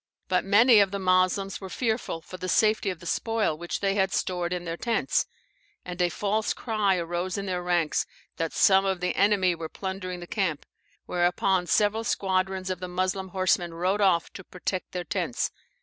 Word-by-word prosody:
But 180 Hz, -, +1 dB
many 220 Hz, +4 st, +6 dB
of 200 Hz, -1 st, +4 dB
the 200 Hz, -, -3 dB
Moslems 185 Hz, +1 st, +1 dB
were 190 Hz, -, -7 dB
fearful 220 Hz, -6 st, -2 dB
for 185 Hz, -, -10 dB
the 185 Hz, 0 st, -5 dB
safety 215 Hz, 0 st, +3 dB
of 180 Hz, -2 st, -5 dB
the -, -, -11 dB
spoil 225 Hz, -2 st, 0 dB
which 175 Hz, +2 st, -5 dB
they 195 Hz, -1 st, +1 dB
had 195 Hz, -1 st, +1 dB
stored 175 Hz, -1 st, -1 dB
in 180 Hz, -1 st, -3 dB
their 165 Hz, 0 st, -3 dB
tents, 230 Hz, +5 st, 0 dB, 0.6 s
and 180 Hz, 0 st, -4 dB
a 175 Hz, -, +3 dB
false 210 Hz, +5 st, -1 dB
cry 210 Hz, -5 st, +1 dB
arose 175 Hz, +2 st, -2 dB
in 200 Hz, -, -3 dB
their 180 Hz, -2 st, -2 dB
ranks 175 Hz, -3 st, 0 dB, 0.3 s
that 165 Hz, -1 st, -1 dB
some 195 Hz, 0 st, +5 dB
of 190 Hz, -2 st, -1 dB
the 180 Hz, 0 st, -1 dB
enemy 195 Hz, -2 st, +3 dB
were 165 Hz, -1 st, -6 dB
plundering 190 Hz, -1 st, -5 dB
the 175 Hz, -, -8 dB
camp; 175 Hz, -6 st, -2 dB, 0.4 s
whereupon 180 Hz, +1 st, +1 dB
several 210 Hz, +5 st, +2 dB
squadrons 190 Hz, -3 st, -1 dB
of 185 Hz, -, -4 dB
the 185 Hz, -, -5 dB
Moslem 185 Hz, +1 st, -2 dB
horseman 180 Hz, -2 st, 0 dB
rode 185 Hz, +4 st, 0 dB
off 180 Hz, -4 st, +2 dB
to 190 Hz, -, -9 dB
protect 185 Hz, +1 st, -4 dB
their 180 Hz, -1 st, -3 dB
tents. -, -, -2 dB
185 Hz, 190 wpm, -26 LUFS, 180-200 Hz, 0.6 s, many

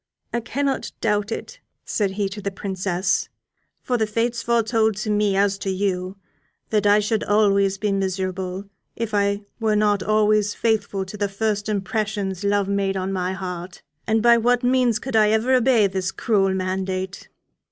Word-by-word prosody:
"I 235 Hz, -, +1 dB
cannot 270 Hz, +3 st, -2 dB
doubt 210 Hz, 0 st, 0 dB
it," -, -, -6 dB, 0.3 s
said 205 Hz, -3 st, 0 dB
he 205 Hz, -2 st, +1 dB
to 205 Hz, +2 st, -7 dB
the 200 Hz, -, -2 dB
Princess, 190 Hz, +1 st, -1 dB, 0.5 s
"for 250 Hz, -, 0 dB
the 220 Hz, -, +1 dB
Fates 230 Hz, +2 st, -1 dB
foretold 225 Hz, -2 st, +1 dB
to 215 Hz, +1 st, -3 dB
me 205 Hz, -1 st, +2 dB
as 200 Hz, 0 st, +2 dB
to 195 Hz, -, -3 dB
you 190 Hz, 0 st, -2 dB, 0.5 s
that 210 Hz, -2 st, +2 dB
I 205 Hz, +1 st, +6 dB
should 210 Hz, +1 st, 0 dB
always 200 Hz, -2 st, +3 dB
be 205 Hz, 0 st, -1 dB
miserable 190 Hz, 0 st, -2 dB, 0.3 s
if 225 Hz, -2 st, -4 dB
I 200 Hz, 0 st, +1 dB, 0.2 s
were 220 Hz, -2 st, +1 dB
not 210 Hz, -2 st, +2 dB
always 215 Hz, 0 st, +2 dB
faithful 205 Hz, -4 st, 0 dB
to 190 Hz, +3 st, -9 dB
the 205 Hz, -1 st, -1 dB
first 205 Hz, +1 st, -1 dB
impressions 200 Hz, -1 st, -2 dB
love 200 Hz, -1 st, +1 dB
made 195 Hz, -1 st, 0 dB
on 190 Hz, +1 st, -2 dB
my 185 Hz, 0 st, -1 dB
heart. 180 Hz, -1 st, -6 dB, 0.2 s
And 220 Hz, 0 st, +2 dB
by 235 Hz, 0 st, +6 dB
what 245 Hz, +2 st, +2 dB
means 250 Hz, -2 st, +3 dB
could 260 Hz, +1 st, -5 dB
I 215 Hz, -1 st, +5 dB
ever 220 Hz, +4 st, +2 dB
obey 250 Hz, -3 st, +4 dB
this 190 Hz, -1 st, -1 dB
cruel 195 Hz, -4 st, +1 dB
mandate? 185 Hz, 0 st, -3 dB
205 Hz, 170 wpm, -22 LUFS, 195-220 Hz, 0.5 s, I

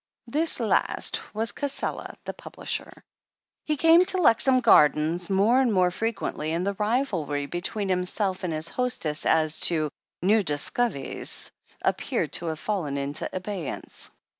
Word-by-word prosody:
This 305 Hz, +7 st, +2 dB
last 225 Hz, -3 st, +2 dB
was 220 Hz, +2 st, +1 dB
Cassela, 285 Hz, -1 st, -2 dB
the -, -, -4 dB
publisher. -, -, -6 dB, 0.6 s
He 305 Hz, -1 st, -1 dB
came 330 Hz, +4 st, +6 dB
to 375 Hz, -, +3 dB
Lexham 265 Hz, -5 st, +4 dB
Gardens 165 Hz, -, +4 dB
more 210 Hz, +7 st, +3 dB
and 250 Hz, -3 st, +2 dB
more 185 Hz, -3 st, +3 dB
fre 225 Hz, +5 st, -2 dB
quently, 200 Hz, -8 st, -4 dB
and 175 Hz, +2 st, -1 dB
the 200 Hz, -, 0 dB
rivalry 200 Hz, -, -1 dB
between 190 Hz, +5 st, -3 dB
himself 185 Hz, +1 st, -1 dB
and 180 Hz, -, -2 dB
his 155 Hz, +1 st, -3 dB
hostess 170 Hz, -11 st, -1 dB
as 155 Hz, -1 st, +2 dB
to 155 Hz, -4 st, -1 dB, 0.3 s
"new 210 Hz, +4 st, +4 dB
discov'ies" 150 Hz, -, -2 dB, 0.3 s
appeared -, -, -1 dB
to 170 Hz, -, 0 dB
have 160 Hz, -1 st, -3 dB
fallen 170 Hz, -10 st, -2 dB
into 140 Hz, +1 st, -2 dB
abeyance. 185 Hz, -4 st, -5 dB
190 Hz, 140 wpm, -26 LUFS, 160-235 Hz, 0.6 s, came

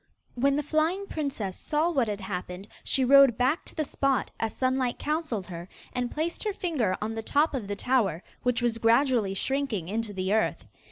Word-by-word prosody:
When 275 Hz, +3 st, +2 dB
the 295 Hz, -, 0 dB
flying 320 Hz, +6 st, 0 dB
princess 275 Hz, -, -3 dB
saw 310 Hz, +3 st, +1 dB
what 265 Hz, -8 st, +1 dB
had 205 Hz, -1 st, -3 dB
happened 180 Hz, 0 st, -5 dB, 0.2 s
she 265 Hz, -, +2 dB
rode 275 Hz, -3 st, +7 dB
back 260 Hz, +6 st, +1 dB
to -, -, -11 dB
the 310 Hz, -, 0 dB
spot, 275 Hz, -1 st, 0 dB
as 225 Hz, -1 st, -2 dB
Sunlight 255 Hz, -1 st, +1 dB
counselled 300 Hz, -, -2 dB
her, 175 Hz, 0 st, -8 dB, 0.2 s
and 250 Hz, -1 st, -1 dB
placed 320 Hz, +5 st, -3 dB
her 425 Hz, -2 st, -1 dB
finger 275 Hz, -, 0 dB
on 215 Hz, +1 st, -3 dB
the 225 Hz, -, -3 dB
top 290 Hz, +7 st, +2 dB
of 240 Hz, -7 st, -3 dB
the 205 Hz, -, -3 dB
tower, 200 Hz, -7 st, +1 dB, 0.2 s
which 250 Hz, -1 st, 0 dB
was 230 Hz, -1 st, +1 dB
gradually 230 Hz, -3 st, +3 dB
shrinking 250 Hz, -8 st, -1 dB
into 220 Hz, +1 st, -2 dB
the 190 Hz, 0 st, -1 dB
earth. 220 Hz, -, 0 dB
250 Hz, 190 wpm, -27 LUFS, 210-285 Hz, 0.2 s, rode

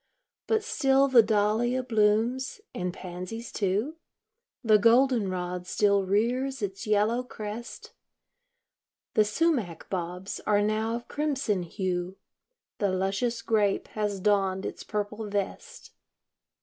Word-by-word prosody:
But 440 Hz, -1 st, +2 dB
still 275 Hz, -9 st, +3 dB
the 255 Hz, -3 st, +7 dB
dahlia 220 Hz, +4 st, +1 dB
blooms, 230 Hz, -, +1 dB
and 180 Hz, 0 st, -2 dB
pansies, 185 Hz, +6 st, -7 dB
too; 210 Hz, -, -1 dB, 0.7 s
The 215 Hz, -2 st, +5 dB
golden 235 Hz, -1 st, +4 dB
rod 180 Hz, -1 st, -4 dB
still 200 Hz, 0 st, +2 dB
rears 245 Hz, +5 st, 0 dB
its 195 Hz, +3 st, -4 dB
yellow 215 Hz, +3 st, +2 dB
crest. 225 Hz, -1 st, -8 dB, 1.2 s
The 215 Hz, -, +4 dB
sumach 210 Hz, -, 0 dB
bobs 180 Hz, +1 st, -4 dB
are 205 Hz, -1 st, +3 dB
now 220 Hz, +2 st, 0 dB
of 240 Hz, 0 st, -7 dB
crimson 275 Hz, -10 st, -1 dB
hue, 180 Hz, +1 st, -3 dB, 0.6 s
The 200 Hz, -3 st, +2 dB
luscious 195 Hz, +6 st, -1 dB
grape 210 Hz, -3 st, +1 dB
has 210 Hz, -2 st, -2 dB
donned 195 Hz, -1 st, +1 dB
its -, -, -5 dB
purple 210 Hz, 0 st, -4 dB
vest. 205 Hz, -, -4 dB
210 Hz, 115 wpm, -27 LUFS, 195-240 Hz, 1.2 s, the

